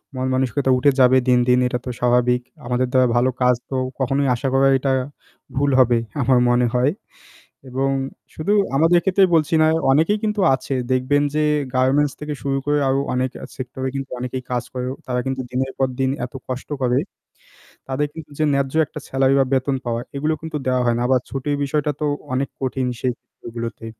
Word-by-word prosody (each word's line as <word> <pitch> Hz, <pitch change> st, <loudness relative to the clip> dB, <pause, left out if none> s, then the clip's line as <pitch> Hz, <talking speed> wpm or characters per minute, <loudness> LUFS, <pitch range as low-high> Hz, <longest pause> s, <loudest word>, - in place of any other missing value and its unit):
মনমানসিকতা 130 Hz, +1 st, 0 dB
উঠে 140 Hz, +3 st, +4 dB
যাবে 130 Hz, 0 st, +6 dB
দিন, 125 Hz, -1 st, +5 dB
দিন 125 Hz, 0 st, +4 dB
এটা 125 Hz, 0 st, -2 dB
তো -, -, -4 dB
স্বাভাবিক। 125 Hz, 0 st, +2 dB, 0.2 s
আমাদের 125 Hz, +1 st, 0 dB
দ্বারা 130 Hz, -1 st, +4 dB
ভালো 120 Hz, +2 st, +3 dB
কাজ 125 Hz, 0 st, +4 dB
তো 135 Hz, -, -3 dB, 0.2 s
কখনোই 135 Hz, +1 st, +1 dB
আশা 120 Hz, -, -3 dB
করা 135 Hz, +1 st, +4 dB
এটা 135 Hz, +1 st, -1 dB, 0.6 s
ভুল 145 Hz, +1 st, +2 dB
হবে 120 Hz, -2 st, +5 dB, 0.2 s
আমার 125 Hz, 0 st, +3 dB
মনে 120 Hz, 0 st, +3 dB
হয় 125 Hz, +3 st, +3 dB, 0.8 s
এবং 135 Hz, +2 st, 0 dB, 0.4 s
শুধু 175 Hz, +7 st, 0 dB, 0.2 s
আমাদের 165 Hz, +4 st, +4 dB
ক্ষেত্রে 195 Hz, 0 st, +3 dB
বলছি 155 Hz, -1 st, +1 dB
না, 155 Hz, -, +5 dB, 0.2 s
অনেকেই 160 Hz, +9 st, +3 dB
কিন্তু 210 Hz, -1 st, 0 dB
আছে 130 Hz, +1 st, -5 dB, 0.2 s
দেখবেন 130 Hz, +3 st, +2 dB
যে 155 Hz, -, +2 dB, 0.3 s
গার্মেন্টস 135 Hz, +3 st, +2 dB
থেকে 150 Hz, 0 st, -4 dB
শুরু 135 Hz, 0 st, 0 dB
করে 145 Hz, 0 st, +2 dB
আরও 135 Hz, +1 st, +2 dB
অনেক 130 Hz, +1 st, 0 dB
আ -, -, -4 dB
সেক্টরে 130 Hz, +1 st, -4 dB
কিন্তু 135 Hz, 0 st, -4 dB
অনেকেই 125 Hz, +1 st, -4 dB
কাজ 125 Hz, -1 st, 0 dB
করে 125 Hz, -1 st, -3 dB, 0.2 s
তারা 125 Hz, -1 st, -1 dB
কিন্তু 130 Hz, 0 st, -2 dB
দিনের 130 Hz, +1 st, -1 dB
পর 135 Hz, -, +2 dB
দিন 130 Hz, 0 st, +2 dB, 0.2 s
এত 125 Hz, -, -12 dB
কষ্ট 130 Hz, 0 st, -5 dB
করে, 125 Hz, -1 st, +2 dB, 0.9 s
তাদের 135 Hz, +2 st, -1 dB
কিন্তু 160 Hz, -1 st, -10 dB
যে 155 Hz, -, +1 dB
ন্যায্য 140 Hz, -1 st, 0 dB
একটা 150 Hz, -, -9 dB
স্যালারি 135 Hz, 0 st, +2 dB
বা 135 Hz, -, +4 dB
বেতন 135 Hz, +1 st, +1 dB
পাওয়া 120 Hz, -1 st, -1 dB
এগুলো 150 Hz, +3 st, 0 dB
কিন্তু 160 Hz, -1 st, -4 dB
দেওয়া 130 Hz, -1 st, +1 dB
হয় 120 Hz, -1 st, +2 dB
না -, -, -1 dB
আবার 130 Hz, 0 st, +3 dB
ছুটির 135 Hz, +3 st, -2 dB
বিষয়টা 150 Hz, +1 st, 0 dB
তো -, -, +1 dB, 0.3 s
অনেক 135 Hz, +2 st, -1 dB
কঠিন 130 Hz, -1 st, -1 dB
সেই 130 Hz, -, 0 dB
ক্ষেত্র -, -, -27 dB
গুলোতে 115 Hz, 0 st, -5 dB
130 Hz, 190 wpm, -21 LUFS, 125-140 Hz, 0.9 s, যাবে